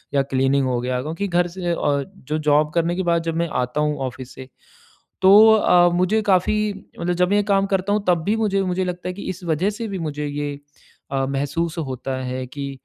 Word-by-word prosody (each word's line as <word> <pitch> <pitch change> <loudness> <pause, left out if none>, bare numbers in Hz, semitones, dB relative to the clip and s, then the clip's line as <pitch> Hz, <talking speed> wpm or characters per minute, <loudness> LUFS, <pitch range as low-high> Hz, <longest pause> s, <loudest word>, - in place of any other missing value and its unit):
या 140 - +4
क्लीनिंग 135 0 +1
हो 125 -1 0
गया। 125 0 -2
क्योंकि 165 +8 -3
घर 175 -1 +1
से 175 0 -4
अ 140 -4 0 0.3
जो 155 - 0
जॉब 150 0 +2
करने 170 0 +1
के 190 - -1
बाद 170 -1 +1
जब 165 -1 -3
मैं 170 0 0
आता 125 +4 -2
हूँ 150 -1 0
ऑफिस 130 0 -9
से 130 - -10 0.8
तो 190 +1 +7 0.2
अ, 180 -4 +5
मुझे 185 +5 +2
काफ़ी 195 0 +2 0.4
मतलब 175 +1 0
जब 180 0 +2
मैं 205 - +3
ये - - +3
काम 195 -1 +3
करता 195 0 0
हूँ 210 -1 -1
तब 175 -2 +3
भी 210 +4 +1
मुझे 205 -3 +1
मुझे 185 0 -1
ये - - -1
लगता 180 0 -5
है - - -2
कि 200 - -8
इस 185 0 -7
वजह 170 +4 0
से 225 +2 -5
भी 195 -2 -4
मुझे 150 -2 -3
ये 145 0 -3 0.6
अ, 135 -1 0
महसूस 145 +5 -2
होता 130 -3 -4
है 130 0 -4
कि 140 +2 -6
165 Hz, 230 wpm, -21 LUFS, 140-185 Hz, 0.8 s, तो